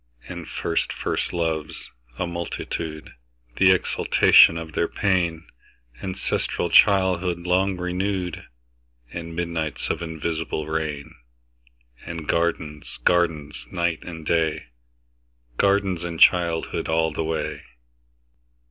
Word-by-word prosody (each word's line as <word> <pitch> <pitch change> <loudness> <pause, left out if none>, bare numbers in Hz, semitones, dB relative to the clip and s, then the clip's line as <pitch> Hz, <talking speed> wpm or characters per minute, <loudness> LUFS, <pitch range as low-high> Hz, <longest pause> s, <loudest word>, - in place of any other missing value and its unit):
And - - -7
first 85 - -1
first - - -2
loves, 80 -3 -3 0.3
a - - -1
multitude, 85 -2 -5 0.4
The 95 - +6
exaltation 90 -2 +5
of 80 -1 -7
their 85 - +1
pain; 85 -5 0 0.6
Ancestral 95 -2 -2
childhood 95 -3 +4
long 90 +2 +1
renewed; 90 0 -2 0.7
And 85 -1 -6
midnights 85 -3 -2
of - - -3
invisible 80 -1 -3
rain; 75 -2 -3 0.9
And 85 -2 -6
gardens, 80 -3 -1
gardens, 80 -4 +1
night 85 -2 -1
and 80 -3 -8
day, 80 -5 0 0.9
Gardens 100 -3 +2
and 85 -2 -5
childhood 85 -2 +3
all 80 0 +2
the 80 - -2
way. 80 0 -3
85 Hz, 105 wpm, -24 LUFS, 80-90 Hz, 0.9 s, The